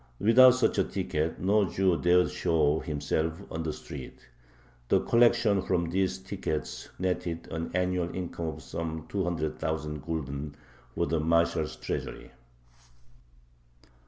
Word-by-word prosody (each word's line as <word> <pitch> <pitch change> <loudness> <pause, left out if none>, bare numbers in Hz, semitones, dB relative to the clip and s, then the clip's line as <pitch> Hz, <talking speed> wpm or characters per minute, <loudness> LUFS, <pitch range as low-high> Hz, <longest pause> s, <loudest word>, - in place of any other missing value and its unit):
Without 125 - +7
such 130 - +1
a - - +5
ticket 80 +2 -2
no 100 +3 +3
Jew 95 -1 +2
dared 90 +1 +4
show 80 -1 +2
himself 80 +4 -2
on 80 - -3
the 80 -1 -2
street. 65 -3 -10 0.6
The - - +5
collection 115 -4 +4
from 85 -3 0
these 95 0 +1
tickets 95 -5 -4
netted 90 -2 -2
an 80 0 -3
annual 90 -1 0
income 85 -2 -4
of 80 0 -6
some 80 -1 -5
200,000 80 -4 -2
gulden 75 -2 -4 0.4
for - - +1
the 80 +1 0
marshal's 85 +2 +1
treasury. - - -5
85 Hz, 125 wpm, -29 LUFS, 80-95 Hz, 0.6 s, Without